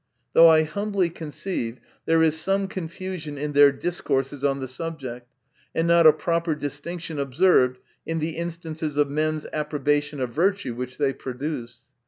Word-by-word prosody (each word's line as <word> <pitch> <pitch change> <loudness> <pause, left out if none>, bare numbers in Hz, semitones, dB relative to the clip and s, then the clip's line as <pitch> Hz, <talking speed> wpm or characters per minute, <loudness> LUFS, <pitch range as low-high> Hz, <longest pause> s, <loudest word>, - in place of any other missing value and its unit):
Though 165 - +9
I 160 -1 +6
humbly 195 +2 -1
conceive, 155 -6 -4 0.3
there 165 0 +4
is 160 -1 +3
some 195 +5 +1
confusion 175 -4 -6
in 145 +1 -3
their 145 0 +7
discourses 140 -3 -2
on 140 -1 +1
the 130 - -4
subject, 130 -4 -6 0.5
and 165 +1 +1
not 170 -1 +6
a - - +10
proper 165 +1 -1
distinction 150 +2 -5
observed 135 -2 +3 0.3
in 165 - -3
the 160 +1 -1
instances 160 -3 -4
of 145 -1 +2
men's 155 +1 -1
approbation 150 -1 0
of 125 -2 -2
virtue, 190 -5 +1
which 125 +1 -6
they 140 -2 +1
produce. 125 -3 -6
155 Hz, 155 wpm, -24 LUFS, 140-165 Hz, 0.5 s, a